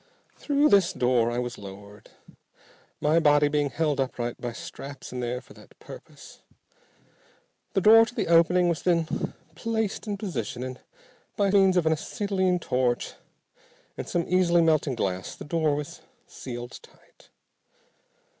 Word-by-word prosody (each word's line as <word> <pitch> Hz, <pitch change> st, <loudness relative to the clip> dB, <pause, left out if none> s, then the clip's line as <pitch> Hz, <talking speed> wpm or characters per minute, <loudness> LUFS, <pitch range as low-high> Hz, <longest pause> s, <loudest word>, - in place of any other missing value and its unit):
Through 290 Hz, +1 st, +2 dB
this 195 Hz, -4 st, +4 dB
door 125 Hz, -2 st, +2 dB
I 120 Hz, -, -3 dB
was 125 Hz, 0 st, -4 dB
lowered, 100 Hz, +1 st, -12 dB, 0.9 s
my 155 Hz, +3 st, +3 dB
body 145 Hz, -2 st, +4 dB
being 145 Hz, -1 st, 0 dB
held 150 Hz, 0 st, -1 dB
upright 120 Hz, -2 st, -3 dB
by 120 Hz, -, -3 dB
straps 135 Hz, +4 st, -9 dB
in 125 Hz, -, -4 dB
there 125 Hz, +1 st, -3 dB
for -, -, -17 dB
that -, -, -18 dB
purpose. -, -, -13 dB, 1.3 s
The 195 Hz, -, +1 dB
door 225 Hz, +3 st, +7 dB
to 240 Hz, -, -10 dB
the 210 Hz, -, -1 dB
opening 170 Hz, +2 st, +4 dB
was 170 Hz, -2 st, -1 dB
then 170 Hz, -3 st, -1 dB, 0.2 s
placed 220 Hz, +3 st, -3 dB
in 205 Hz, -1 st, -2 dB
position, 125 Hz, -, -4 dB
and 130 Hz, 0 st, -6 dB, 0.6 s
by 200 Hz, -2 st, +2 dB
means 195 Hz, -2 st, +4 dB
of 175 Hz, -, +2 dB
an 160 Hz, -, +3 dB
acetylene 190 Hz, +2 st, -1 dB
torch 125 Hz, -7 st, -1 dB, 0.8 s
and -, -, -6 dB
some 170 Hz, -1 st, 0 dB
easily 175 Hz, -2 st, +3 dB
melting 155 Hz, -4 st, +2 dB
glass, 95 Hz, -4 st, -3 dB
the -, -, -10 dB
door 155 Hz, -1 st, +1 dB
was 145 Hz, 0 st, -6 dB, 0.2 s
sealed 120 Hz, -1 st, -8 dB
tight. -, -, -22 dB
155 Hz, 145 wpm, -26 LUFS, 125-185 Hz, 1.3 s, door